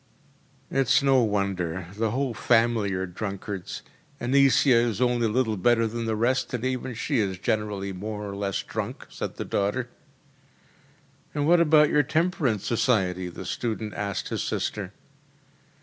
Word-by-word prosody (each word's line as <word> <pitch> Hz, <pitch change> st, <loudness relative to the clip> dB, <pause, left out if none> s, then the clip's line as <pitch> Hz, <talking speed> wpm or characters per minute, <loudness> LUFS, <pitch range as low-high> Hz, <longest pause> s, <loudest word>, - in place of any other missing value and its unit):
‚ÄĚ -, -, -2 dB
“It’s 135 Hz, +1 st, +4 dB
no 135 Hz, -2 st, +5 dB
wonder 95 Hz, -5 st, -1 dB
the 110 Hz, +1 st, 0 dB
whole 130 Hz, +2 st, -1 dB
family 115 Hz, -2 st, +2 dB
are 95 Hz, 0 st, -1 dB
drunkards. 100 Hz, 0 st, -5 dB, 0.4 s
Annisia 130 Hz, -1 st, +4 dB
is 115 Hz, -3 st, -1 dB
only 120 Hz, -2 st, +2 dB
a -, -, -1 dB
little 110 Hz, -2 st, +1 dB
better 115 Hz, +4 st, +3 dB
than 115 Hz, +1 st, -3 dB
the 110 Hz, -1 st, 0 dB
rest, 125 Hz, +4 st, +1 dB
and 125 Hz, +1 st, -3 dB
even 130 Hz, -1 st, -2 dB
she 135 Hz, +3 st, 0 dB
is 95 Hz, -3 st, -1 dB
generally 100 Hz, 0 st, -2 dB
more 105 Hz, +2 st, -5 dB
or 100 Hz, -, -5 dB
less 100 Hz, -1 st, -2 dB
drunk,‚ÄĚ -, -, -6 dB
said -, -, -5 dB
the -, -, -5 dB
daughter. 110 Hz, +5 st, -1 dB, 1.5 s
“And 145 Hz, -1 st, 0 dB
what 175 Hz, +1 st, +6 dB
about 150 Hz, -2 st, +5 dB
your 150 Hz, -, +5 dB
temperance 150 Hz, -, 0 dB
society?‚ÄĚ 95 Hz, -7 st, +1 dB
the 95 Hz, -, -7 dB
student 110 Hz, +1 st, -3 dB
asked 100 Hz, -1 st, -3 dB
his -, -, -2 dB
sister. 100 Hz, -3 st, -3 dB
115 Hz, 155 wpm, -26 LUFS, 100-130 Hz, 1.5 s, what